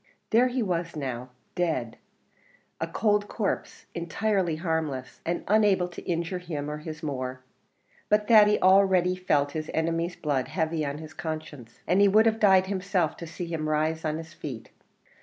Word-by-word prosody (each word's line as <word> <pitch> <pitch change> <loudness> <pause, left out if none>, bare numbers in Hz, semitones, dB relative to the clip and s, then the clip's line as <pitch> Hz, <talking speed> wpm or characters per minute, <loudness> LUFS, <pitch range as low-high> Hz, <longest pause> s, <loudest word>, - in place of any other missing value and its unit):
There 235 +3 +5
he 250 -1 -1
was 170 -4 -2
now 130 -4 -4 0.2
dead 160 -10 -1 0.8
a - - -2
cold 210 -2 +1
corpse 205 -2 -3
entirely 175 +1 0
harmless, 155 -6 -3
and 170 - -1
unable 205 -3 +3
to 175 - -9
injure 170 +1 -1
him 150 -5 -5
or 150 - -5
his 155 +1 -8
more. 130 -3 -4 0.7
But 210 0 +3
Thady 210 -2 +6
already 185 -1 +5
felt 150 -6 +1
his 155 0 -4
enemy's 165 +2 0
blood 140 -4 -1
heavy 160 -2 -1
on 140 0 -3
his 155 0 -9
conscience, 155 -7 -7
and 185 +3 +3
he 200 - +7
would 215 +3 +5
have 225 0 +2
died 190 -3 +5
himself 190 -4 -1
to 170 - -7
see 175 +2 -6
him 160 -2 -3
rise 155 +1 0
on 155 -1 -1
his 160 0 -9
feet. 130 -7 -8
165 Hz, 165 wpm, -27 LUFS, 155-190 Hz, 0.8 s, he